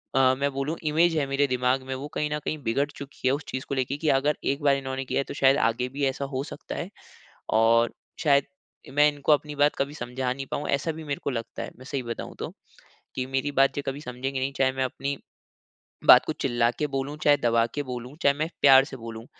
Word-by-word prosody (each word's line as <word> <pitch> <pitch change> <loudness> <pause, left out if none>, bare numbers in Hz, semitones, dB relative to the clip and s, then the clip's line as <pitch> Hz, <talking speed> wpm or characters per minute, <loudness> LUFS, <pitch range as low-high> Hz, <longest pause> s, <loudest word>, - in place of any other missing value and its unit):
अ, 130 -1 +5
मैं 140 0 +1
बोलूँ 140 +4 -2
इमेज़ 160 +2 +3
है 145 - +1
मेरे 140 +1 +2
दिमाग 125 +1 +1
में 130 - -3
वो 135 +3 -6
कहीं 150 - 0
न 150 - -1
कहीं 155 - -1
बिगड़ 125 +5 +1
चुकी 140 -2 -5
है 130 - +4
उस 145 +2 -2
चीज़ 130 - -4
को 140 - -1
लेके 130 +1 -1
कि 155 +1 0
अगर 145 +1 0
एक 140 +2 -1
बार 140 -1 +5
इन्होने 135 0 -4
किया - - -1
है - - +1
तो - - -4
शायद 135 -1 +4
आगे 125 +2 +1
भी 140 +2 -2
ऐसा 135 +1 -1
हो 130 - -1
सकता - - -7
है। - - -4 0.7
और 115 +1 +4 0.3
शायद 140 -3 +4 0.4
मैं 145 +2 +5
इनको 145 +1 -1
अपनी 150 0 +2
बात 145 +1 +3
कभी 140 +1 -1
समझा 125 -1 -3
नहीं 135 +1 -6
पाऊँ 145 - -2
ऐसा 140 +3 0
भी 160 0 -8
मेरे 140 -1 -3
को - - -1
लगता 115 -2 -5
है। - - -6
मैं 130 - -12
सही 140 -1 -3
बताऊँ 115 -1 -6
तो, - - -4 0.7
कि 130 - -1
मेरी 135 +2 -1
बात 135 -1 +3
जे 145 - -1
कभी 135 +2 -3
समझेंगे 130 0 -4
नहीं 135 +1 -1
चाहे 130 -1 +3
मैं 130 0 -1
अपनी 140 +2 -3 0.9
बात - - +9
को - - -2
चिल्ला 120 -1 +1
के 150 - +1
बोलूँ, 140 +1 -3
चाहे 145 -1 +4
दबा 115 -3 +2
के 145 - -1
बोलूँ, 125 0 -7
चाहे 140 - +5
मैं 155 +3 -2
प्यार 135 -1 +8
से 135 -2 -9
बोलूँ। 115 -1 -8
135 Hz, 240 wpm, -26 LUFS, 130-145 Hz, 0.9 s, बात